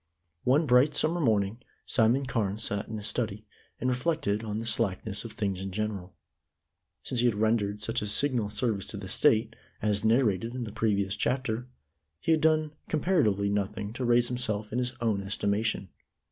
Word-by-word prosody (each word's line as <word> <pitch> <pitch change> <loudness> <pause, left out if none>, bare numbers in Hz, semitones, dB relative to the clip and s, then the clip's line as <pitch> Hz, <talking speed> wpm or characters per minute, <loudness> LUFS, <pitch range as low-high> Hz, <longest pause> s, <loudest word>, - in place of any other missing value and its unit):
* 85 0 -50
One 155 +4 +3
bright 135 +3 +4
summer 165 +4 +2
morning 110 -4 +1 0.3
Simon 125 +4 +2
Carne 105 -6 -1
sat 100 -2 -1
in 110 - -5
his 105 - -6
study, 105 -1 0 0.3
and 125 - -1
reflected 125 -4 0
on 105 -1 -3
the 115 - -4
slackness 105 -2 -1
of 115 - -7
things 100 -5 -2
in 95 - -4
general. 100 -2 -4 0.9
Since 125 - -2
he 125 - +4
had 115 - +1
rendered 105 -1 0
such 115 +3 0
a 105 - -3
signal 120 0 +1
service 105 -3 -1
to 105 - -6
the 100 -1 -7
State, 115 0 +2 0.2
as 105 0 0
narrated 115 -1 +2
in 125 - -3
the 110 - -6
previous 100 -3 0
chapter, 125 +1 -1 0.5
he 165 - 0
had 160 -1 +3
done 155 -1 +3 0.2
comparatively 130 - +2
nothing 100 +1 -2
to 125 - -4
raise 120 0 +3
himself 110 -4 -2
in 125 - +1
his 125 0 -1
own 110 -4 +1
estimation. 100 0 -1
110 Hz, 180 wpm, -28 LUFS, 100-125 Hz, 0.9 s, bright